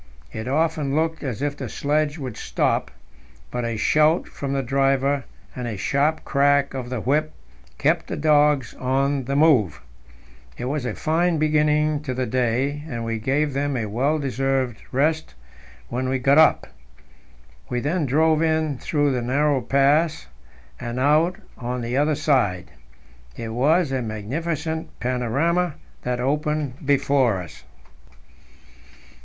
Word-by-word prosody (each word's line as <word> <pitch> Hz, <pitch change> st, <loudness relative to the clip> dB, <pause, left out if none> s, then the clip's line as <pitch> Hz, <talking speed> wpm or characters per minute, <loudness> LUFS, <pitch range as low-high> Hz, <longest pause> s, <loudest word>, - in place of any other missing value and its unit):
It 110 Hz, +2 st, -6 dB
often 150 Hz, 0 st, 0 dB
looked 160 Hz, +1 st, 0 dB
as 130 Hz, -1 st, -3 dB
if 145 Hz, -1 st, -1 dB
the 130 Hz, -5 st, -6 dB
sledge 150 Hz, +4 st, 0 dB
would 130 Hz, -7 st, -6 dB
stop, -, -, -1 dB, 0.6 s
but 125 Hz, -, -2 dB
a 115 Hz, -1 st, -2 dB
shout 155 Hz, +8 st, +3 dB
from 140 Hz, -1 st, -5 dB
the 135 Hz, -1 st, 0 dB
driver 135 Hz, +1 st, +1 dB, 0.3 s
and 125 Hz, -1 st, -4 dB
a 110 Hz, -3 st, -4 dB
sharp 145 Hz, +9 st, 0 dB
crack 140 Hz, 0 st, +2 dB
of 130 Hz, -2 st, -5 dB
the 125 Hz, -2 st, -3 dB
whip 150 Hz, +6 st, 0 dB, 0.5 s
kept -, -, +1 dB
the -, -, -4 dB
dogs 145 Hz, -4 st, +3 dB
on 135 Hz, +1 st, 0 dB
the 140 Hz, +2 st, -2 dB
move. 140 Hz, -, +3 dB, 0.8 s
It -, -, -4 dB
was 140 Hz, 0 st, -2 dB
a 115 Hz, -, -3 dB
fine 165 Hz, +2 st, +1 dB
beginning 150 Hz, 0 st, +2 dB
to 130 Hz, -4 st, -4 dB
the 130 Hz, 0 st, -1 dB
day, 130 Hz, +4 st, 0 dB
and 115 Hz, -4 st, -4 dB
we 115 Hz, -1 st, -2 dB
gave 140 Hz, +5 st, 0 dB
them 140 Hz, 0 st, -1 dB
a 115 Hz, -, -2 dB
well 130 Hz, +9 st, 0 dB
deserved 135 Hz, -3 st, -1 dB
rest 155 Hz, +4 st, 0 dB, 0.5 s
when 130 Hz, +2 st, -2 dB
we 130 Hz, -, +1 dB
got 135 Hz, +3 st, +4 dB
up. 160 Hz, -, +5 dB, 1.0 s
We 125 Hz, -, -1 dB
then 150 Hz, +4 st, -1 dB
drove 155 Hz, +3 st, +3 dB
in 155 Hz, -4 st, 0 dB
through 145 Hz, -2 st, +1 dB
the 125 Hz, -2 st, -1 dB
narrow 140 Hz, +3 st, +1 dB
pass 145 Hz, +6 st, +2 dB, 0.5 s
and 120 Hz, 0 st, -4 dB
out 155 Hz, +6 st, +3 dB, 0.2 s
on 125 Hz, 0 st, -3 dB
the 120 Hz, +1 st, -3 dB
other 150 Hz, +2 st, +2 dB
side. 130 Hz, -, 0 dB, 0.7 s
It 115 Hz, -, -5 dB
was 145 Hz, +7 st, +2 dB
a 130 Hz, -1 st, -1 dB
magnificent 155 Hz, +9 st, -4 dB
panorama 140 Hz, +8 st, 0 dB, 0.3 s
that 125 Hz, 0 st, -2 dB
opened 150 Hz, +1 st, -1 dB
before 135 Hz, -6 st, +2 dB
us. 85 Hz, -4 st, -10 dB
140 Hz, 145 wpm, -23 LUFS, 125-150 Hz, 1.0 s, up